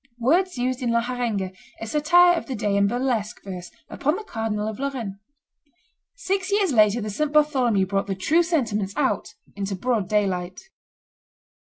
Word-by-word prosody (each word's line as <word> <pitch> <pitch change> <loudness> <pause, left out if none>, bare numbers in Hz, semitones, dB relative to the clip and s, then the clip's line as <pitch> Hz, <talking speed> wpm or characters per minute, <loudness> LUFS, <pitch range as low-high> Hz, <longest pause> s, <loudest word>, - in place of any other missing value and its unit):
[Words 335 +8 +2
used 255 +1 -1
in 245 - 0
La 235 0 +3
Harenga, 235 -6 -2 0.3
a - - -5
satire 345 +8 +5
of 335 - -4
the 265 - -3
day 205 -2 -1
in 200 0 +3
burlesque 240 -2 -1
verse 180 -3 -7 0.2
upon 300 +4 -1
the 430 - -6
Cardinal 220 - -3
of 220 +2 -5
Lorraine.] 245 -8 -4 1.0
Six 390 -4 -2
years 400 -6 +2
later 215 0 +4
the 215 0 -4
St. 300 +7 -1
Bartholomew 260 -10 +3
brought 195 +1 -1
the 195 - -2
true 310 - +2
sentiments 225 - -1
out - - -1 0.2
into 195 -1 -3
broad 220 -1 -1
daylight. 185 -4 0
235 Hz, 165 wpm, -24 LUFS, 200-295 Hz, 1.0 s, satire